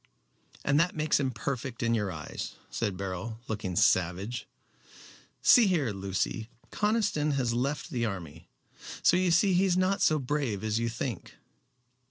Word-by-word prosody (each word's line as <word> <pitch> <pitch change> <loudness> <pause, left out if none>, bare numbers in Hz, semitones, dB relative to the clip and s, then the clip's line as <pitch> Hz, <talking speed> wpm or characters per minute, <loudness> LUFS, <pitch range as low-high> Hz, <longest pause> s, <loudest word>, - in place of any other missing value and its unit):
"And 145 +1 +3
that 170 +2 +2
makes 155 -1 +2
him 135 -2 +1
perfect 130 +1 -4
in 115 0 +2
your 105 -4 0
eyes," 75 -3 -6 0.2
said 105 -5 -2
Beryl, 100 +4 -5
looking 100 -4 -3
savage. 95 +8 +1 1.0
"See 235 -4 +7
here, 155 - +1
Lucy, 100 +3 -2 0.2
Conniston 210 -9 +1
has 125 -4 0
left 140 +7 -2
the 120 -5 -1
army 90 -9 -5 0.5
so - - +5
you 185 0 +2
see 185 +3 +4
he 185 +2 +4
is 180 -2 +2
not 185 +2 +1
so 155 - +4
brave 135 -7 -2
as 110 0 0
you 115 0 0
think." 115 -2 -5
120 Hz, 155 wpm, -29 LUFS, 105-155 Hz, 1.0 s, See